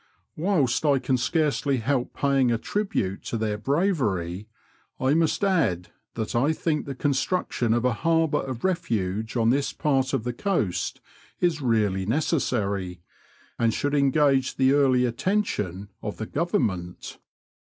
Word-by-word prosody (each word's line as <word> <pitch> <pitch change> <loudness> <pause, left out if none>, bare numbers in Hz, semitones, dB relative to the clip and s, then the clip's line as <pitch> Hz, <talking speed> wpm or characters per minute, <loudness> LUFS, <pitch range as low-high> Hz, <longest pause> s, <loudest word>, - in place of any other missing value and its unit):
Whilst 155 -8 +1
I 145 -3 +4
can 130 0 0
scarcely 140 0 +1
help 125 +2 -1
paying 135 -3 +2
a 115 - +2
tribute 110 - -2
to 115 - -2
their 105 -1 -2
bravery, 110 - 0 0.5
I 130 +2 +2
must 165 +5 +1
add 125 - +1 0.3
that 110 -2 -3
I 140 +7 +3
think 155 -2 -1
the 135 - -4
construction 135 -3 0
of 120 +2 +1
a 125 - +3
harbour 165 +3 +1
of 130 -3 -6
refuge 110 - -1
on 115 0 +3
this 140 +2 0
part 135 -3 0
of 130 -5 0
the 125 0 -3
coast 120 - -1 0.4
is 170 -4 +1
really 105 -6 +1
necessary, 100 - -1 0.6
and 115 -1 +3
should 145 0 -1
engage 140 -1 +3
the 130 0 +3
early 130 -3 +4
attention 115 - -1
of 105 - -5
the 110 - -4
Qovernment. 110 - -2
130 Hz, 145 wpm, -25 LUFS, 110-150 Hz, 0.6 s, I